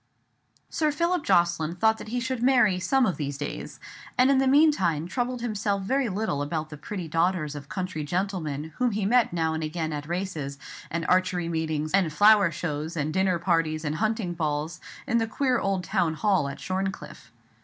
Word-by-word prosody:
Sir 305 -1 +1
Philip 340 +2 0
Jocelyn 170 -1 +2
thought 220 +4 +2
that - - -8
he 245 +3 -2
should 260 -1 -3
marry 245 -7 +4
"some 260 +8 +2
of 185 - -1
these 140 -2 -3
days," 145 - -6 0.4
and 255 +2 +5
in 270 - +4
the 270 - +2
meantime 265 - +3
troubled 245 +3 -2
himself 205 -4 -1
very 265 +4 0
little 200 -7 -1
about 155 +1 -3
the - - -6
pretty 180 +3 -6
daughters 165 -1 0
of 145 -1 -9
country 185 -4 -3
gentlemen 160 -3 -3
whom 250 -3 +1
he 205 -1 -1
met 240 +3 +3
now 160 -2 0
and 160 - -3
again 160 0 -3
at 150 0 -5
races, 165 -6 -3 0.3
and 165 0 -3
archery 185 -2 +1
meetings, 160 -2 -2
and 190 -5 +3
flower 205 +2 +6
shows, 155 +1 -4
and 155 0 -1
dinner 190 -1 +2
parties, 165 -2 0
and 150 +1 -2
hunting 215 -4 -1
balls, 155 -1 -2 0.3
in 235 -4 +2
the 225 - 0
queer 255 +1 +1
old 195 -2 -1
town 165 -2 0
hall 190 -6 +1
at 140 - -8
Shorncliffe. 185 -10 -4
180 Hz, 185 wpm, -26 LUFS, 155-220 Hz, 0.4 s, flower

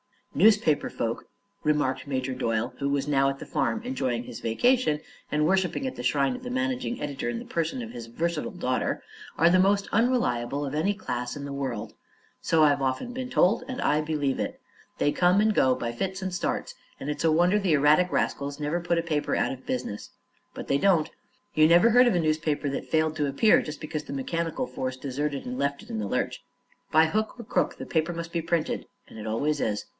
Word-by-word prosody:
"Newspaper 200 -3 +4
folk," 115 0 -3 0.4
remarked 145 -4 0
Major 130 -1 -2
Doyle, 115 -1 -1
who 140 0 0
was 140 0 0
now 135 -2 +3
at 135 - -4
the - - -8
farm 225 - -1
enjoying 130 - -2
his - - -8
vacation 155 - +2 0.3
and 150 0 +1
worshipping 190 - +1
at 260 - -3
the - - -5
shrine 140 - +2
of - - -12
the 250 - -6
managing 260 -1 -2
editor 140 -4 -3
in 120 - -3
the - - -7
person 170 +10 -2
of 230 - -8
his 115 -1 -8
versatile 165 +6 -2
daughter, 130 -9 -2 0.3
"are 170 +2 +5
the 185 +1 +4
most 200 +1 +3
unreliable 145 - +1
of 135 - -5
any 160 +7 +1
class 125 - -4
in 145 - -6
the 140 0 -5
world. 130 -6 -4 0.5
So 160 -1 +3
I've 145 -2 +4
often 135 - -1
been 255 0 -5
told, 235 +1 +3
and 260 -1 -4
I 150 - +2
believe 150 -3 -1
it. - - -3 0.4
They 145 - +3
come 180 +4 +3
and 215 0 +3
go, 130 -8 +3
by 120 -1 -3
fits 190 +10 -3
and 185 -1 -3
starts, 175 - -2 0.2
and 140 - -6
it's 150 - -2
a 160 - +5
wonder 175 +6 +4
the 190 -5 +1
erratic 150 +5 +4
rascals 140 +1 -1
never 150 +3 -1
put 170 0 0
a 170 - +1
paper 155 -3 -1
out - - +1
of 130 0 -8
business. 120 -5 -4 0.5
But - - -7
they 140 - +3
don't. 170 -2 +3 0.4
You 155 -3 +5
never 175 +7 +6
heard 245 +2 +6
of 235 - +3
a - - +3
newspaper 155 -2 0
that 135 - -4
failed 155 -1 +1
to 145 -2 +1
appear 140 +11 +4
just 150 -1 -7
because 155 -1 -4
the - - -6
mechanical 165 - -2
force 130 - -4
deserted 140 +2 -3
and 125 +1 -4
left 140 0 -1
it - - -16
in 110 - -3
the 105 - -2
lurch. - - -2 0.5
By 160 +1 +5
hook 215 +6 -1
or 235 - -7
crook - - 0
the - - -6
paper 160 +1 0
must 170 0 -6
be 170 - -1
printed 165 -1 -1 0.2
and - - -11
it 110 - -6
always 145 +7 0
is. 105 -4 -1
155 Hz, 220 wpm, -27 LUFS, 135-180 Hz, 0.5 s, never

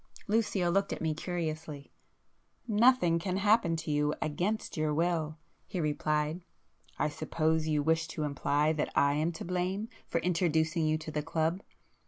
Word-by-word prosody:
Lucio 205 -5 +1
looked 195 +2 +1
at - - -3
me 160 -1 0
curiously. 155 -3 -4 0.8
"Nothing 215 -6 +4
can 185 +2 -2
happen 205 -4 +3
to 160 -1 -4
you 150 0 +1
against 185 +9 -2
your 155 -1 0
will"—he 160 +1 -2
replied; 150 +1 0 0.6
"I - - +1
suppose 160 +1 0
you 150 -2 +1
wish 160 +1 +2
to 155 - -4
imply 145 +1 +1
that 150 -1 -2
I 140 0 +4
am 155 +3 +1
to - - -7
blame 185 +5 -2 0.2
for 170 - 0
introducing 165 -2 +1
you 155 0 +2
to 155 0 -7
the 150 - -1
club? 160 +3 -1
160 Hz, 155 wpm, -31 LUFS, 155-180 Hz, 0.8 s, Nothing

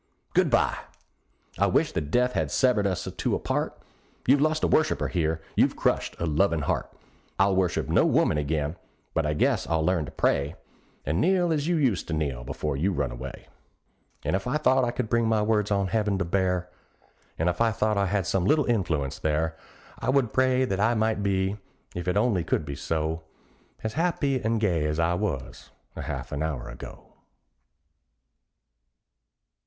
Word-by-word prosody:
Good - - +3
bye! - - +2 0.8
I - - +4
wish - - +2
that 75 - -3
death 125 +7 +2
had - - 0
severed 120 -6 +2
us 95 -2 -2
two - - 0
apart. - - -2 0.5
You've 135 +2 +4
lost 155 +1 +1
a - - +4
worshiper 155 - +2
here 80 -2 -1
you've - - +3
crushed - - 0
a 85 - -2
lovin' 80 0 +1
heart. - - -1 0.5
I'll 95 0 +3
worship 95 -2 +1
no - - +4
woman 75 - +3
again; 75 +2 -1 0.4
but 80 -2 +1
I 75 - +1
guess - - +1
I'll 80 -1 +1
learn 90 -3 +1
to - - -9
pray, 70 +1 0 0.5
And 80 +5 0
kneel 180 -2 +3
as 150 0 -1
you 175 - +2
used 130 - +1
to 80 - -2
kneel 70 -6 -2
before 75 +3 -3
you 85 +9 +1
run 70 -8 -1
away. - - -8 0.8
And - - 0
if 95 +5 -3
I 130 +5 +1
thought 130 -3 +3
I 120 - +1
could 120 -1 -2
bring 115 0 +2
my 110 -1 +2
words 105 -1 +1
on 100 -1 +1
heaven 105 -2 +1
to 95 - -1
bear, 90 0 0 0.7
And 80 - 0
if 90 - 0
I 115 - +5
thought 110 0 0
I 100 -1 +1
had 95 -1 0
some 90 0 0
little 150 +7 +3
influence 85 - -1
there, 80 +1 0 0.4
I - - -2
would 130 -4 +2
pray 130 0 +3
that 95 -5 -2
I 115 +3 +3
might 110 -1 +1
be, 95 0 0 0.4
if 90 +1 -5
it 90 +2 +1
only 105 -5 +2
could 80 - -1
be 70 - -5
so. 80 +3 -2 0.6
As 110 0 -2
happy 145 -5 0
and 115 +1 0
gay 85 -8 +1
as 75 0 -1
I 85 +1 +2
was 90 - -4 0.3
a - - -5
half - - -5
an 70 - -3
hour 75 -6 -3
ago. 60 - -11
95 Hz, 185 wpm, -26 LUFS, 80-115 Hz, 0.8 s, I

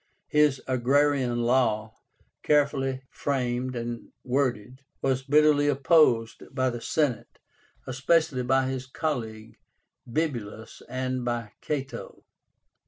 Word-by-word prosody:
His 150 -3 +3
AGRARIAN 130 -1 +2
LAW, 115 -3 +1 0.5
carefully 135 -3 +1
framed 125 -2 -2
and 120 0 -5
worded, 130 -1 -1 0.2
was 130 -1 0
bitterly 145 +1 +4
opposed 135 -5 +3
by 130 -1 +1
the 120 -1 -6
Senate, 145 -5 -1 0.5
especially 135 +1 +1
by 130 +1 +2
his 130 -1 -4
colleague, 115 -7 -4 0.5
Bibulus, 115 -8 -3
and 130 0 -2
by 120 -3 -3
Cato. 140 -3 -5
130 Hz, 100 wpm, -27 LUFS, 120-145 Hz, 0.5 s, bitterly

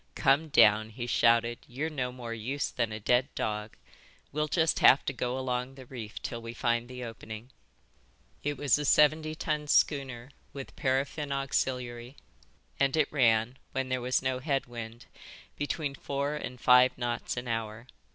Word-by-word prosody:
"Come 140 +4 +3
down," 110 -5 +5
he 120 +2 -6
shouted. 115 0 +3
"You're 145 +6 -3
no 125 -4 -2
more 120 -2 -6
use 125 +6 -3
than 115 -3 -1
a 110 - -5
dead 125 +5 +2
dog. 105 0 -3 0.6
We'll 150 +1 -1
just 160 0 +2
have 135 - +6
to 140 - -1
go 125 0 -2
along 130 0 -2
the 130 -1 -11
reef 115 -4 -8
till 115 -1 -4
we 115 +1 -7
find 120 0 0
the 125 0 -7
opening." 115 +1 -8 0.9
It 145 -1 -2
was 145 +1 +2
a - - -2
seventy 155 +2 +4
ton 150 -1 -2
schooner 135 -4 +1 0.2
with 135 -1 -8
paraffin 140 +2 -1
auxiliary, 125 -2 -2 0.6
and 140 +2 +2
it 150 -2 +2
ran, 120 -2 +2
when 130 -1 -2
there 130 -1 -1
was 125 +2 0
no 130 -1 0
head 135 0 -1
wind, 115 -1 -8 0.5
between 145 0 -2
four 140 +1 -3
and 130 -4 -6
five 125 0 +5
knots 120 0 -3
an 125 0 -4
hour. 115 0 -3
125 Hz, 165 wpm, -29 LUFS, 120-140 Hz, 0.9 s, have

